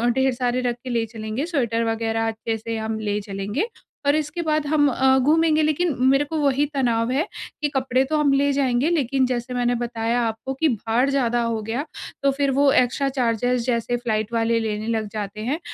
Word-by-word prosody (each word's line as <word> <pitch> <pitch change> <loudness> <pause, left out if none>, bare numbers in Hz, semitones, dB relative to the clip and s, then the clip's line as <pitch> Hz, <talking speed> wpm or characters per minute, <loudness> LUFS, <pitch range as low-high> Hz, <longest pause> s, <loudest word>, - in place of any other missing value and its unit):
ढेर 265 0 +2
सारे 245 0 -1
रख 245 -1 -1
के 255 - -6
ले 230 -2 0
चलेंगे, 220 +5 -3
स्वेटर 240 -9 0
वग़ैरह 225 0 -1
अच्छे 225 0 -3
से 225 +1 -4
हम 220 0 -3
ले 210 -1 -1
चलेंगे 200 - -3 0.4
और 285 - +5
इसके 310 +2 -2
बाद 310 -2 0
हम 290 -1 +3
अ, 265 +1 +3
घूमेंगे। 315 +3 +3
लेकिन 310 +1 +1
मेरे 275 +2 +4
को 315 +2 -4
वहीं 285 0 +2
तनाव 235 -3 +1
है 290 +6 0 0.3
कि 295 - +1
कपड़े 260 -1 +2
तो 310 +2 0
हम 285 -2 +3
ले 280 +1 +3
जाएँगे, 270 +1 +1
लेकिन 275 -5 +1
जैसे 250 0 -3
मैंने 245 0 +1
बताया 235 0 -1
आपको 225 +3 -3
कि 310 +4 +1
भार 230 +3 +1
ज़्यादा 240 -4 +1
हो 230 -1 -1
गया, 230 +7 -3 0.4
तो 275 - +4
फिर 275 0 0
वो 275 +1 +4
एक्स्ट्रा 260 +3 +2
चार्जेज़ 245 -2 0
जैसे 240 -1 0
फ्लाइट 220 -2 -2
वाले 230 0 +2
लेने 215 -1 -3
लग 220 -2 -1
जाते 210 0 -5
हैं। 265 +8 -1
245 Hz, 200 wpm, -23 LUFS, 225-280 Hz, 0.4 s, और